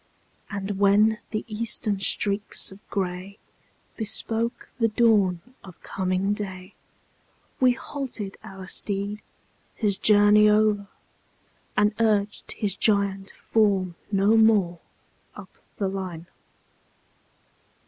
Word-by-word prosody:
And 200 -1 -4
when 210 +2 +4
the 215 - -4
Eastern 215 -2 -1
streaks 200 +1 +2
of 190 - -13
gray 190 +1 -4 0.6
Bespoke 225 +1 -1
the 230 - +3
dawn 210 -6 +2 0.2
of 185 -3 -13
coming 190 +1 -1
day, 190 -3 -7 0.9
We 255 -1 +4
halted 245 -7 -6
our 190 -1 -10
steed, 200 +2 -2 0.5
his 200 -3 +1
journey 210 0 +6
o'er, 210 -1 +2 0.9
And 210 0 +3
urged 210 -2 0
his 205 -3 -2
giant 200 -2 +1
form 195 -5 0 0.2
no 200 +2 +3
more, 210 -6 +3 0.6
Up - - -12 0.2
the 200 - -1
line. 185 -4 -5
205 Hz, 100 wpm, -24 LUFS, 195-215 Hz, 0.9 s, journey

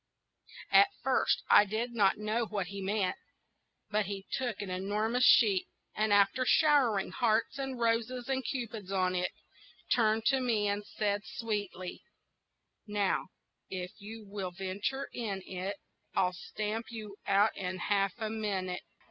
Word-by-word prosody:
At 400 - +8 0.2
first - - +2
I - - +8
did 220 +4 -3
not 200 -4 +3
know 215 +2 -1
what 205 -3 -2
he 200 0 -6
meant: 195 -1 0 0.7
but 210 -2 +1
he 195 -1 -5
took 245 -6 -2
an 190 - -6
enormous 210 +6 0
sheet, 200 -5 +5 0.3
and 215 0 0
after 205 +5 +4
showering 255 -8 +3
hearts 230 +1 +1
and 270 -2 -3
roses 235 +2 0
and 265 -1 0
cupids 225 -7 -4
upon 185 -2 +1
it, 180 0 0 0.6
turned 220 -2 +3
to 270 +1 +4
me, 225 -5 +1
and 205 +1 -1
said, 205 0 -1
sweetly,— 205 -6 -4 0.9
"Now 205 -2 0 0.4
if 180 -1 -4
you 215 +1 -9
will 195 -2 -4
venture 195 +9 -3
in 200 -5 -3
it, 190 +2 -4 0.4
I'll 180 -1 +2
stamp 215 +5 -4
you 215 -3 -8
out 200 +2 +4
in 185 -1 -3
half 195 +1 +1
a 220 -2 -3
minute." 195 -4 -2
210 Hz, 145 wpm, -31 LUFS, 195-230 Hz, 0.9 s, At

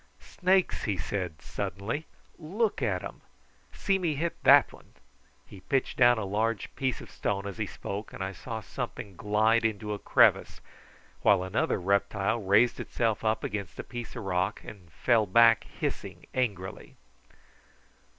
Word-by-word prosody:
"Snakes!" 185 0 +1
he 100 -4 -1
said 90 -3 -4
suddenly. 100 +9 -4 0.3
"Look 195 +4 -1
at 95 -7 0
'em. - - -8 0.5
See 195 -1 0
me 165 -5 0
hit 165 +4 -2
that - - +6
one." - - -18 0.5
He 100 - -13
pitched 135 +7 -1
down 120 -1 +6
a 110 - -2
large 110 +2 -2
piece 130 -2 -2
of - - -12
stone 100 -1 -2
as 100 -3 -6
he - - -1
spoke, 100 +2 -6
and - - -6
I 95 - -3
saw 110 +3 -6
something 100 -1 -6
glide 110 +4 +2
into 105 -1 -1
a 105 - -5
crevice, - - +3 0.6
while 95 -3 +4
another 95 +2 0
reptile 100 +3 0
raised 105 +5 +3
itself 115 -3 -1
up 110 0 0
against 100 -4 -4
a - - -5
piece 120 -2 -8
of - - -5
rock 95 +1 -1
and 90 -6 -12
fell 110 - +2
back 115 +2 +5
hissing - - -5
angrily. 100 -8 -3
105 Hz, 155 wpm, -28 LUFS, 100-120 Hz, 0.6 s, that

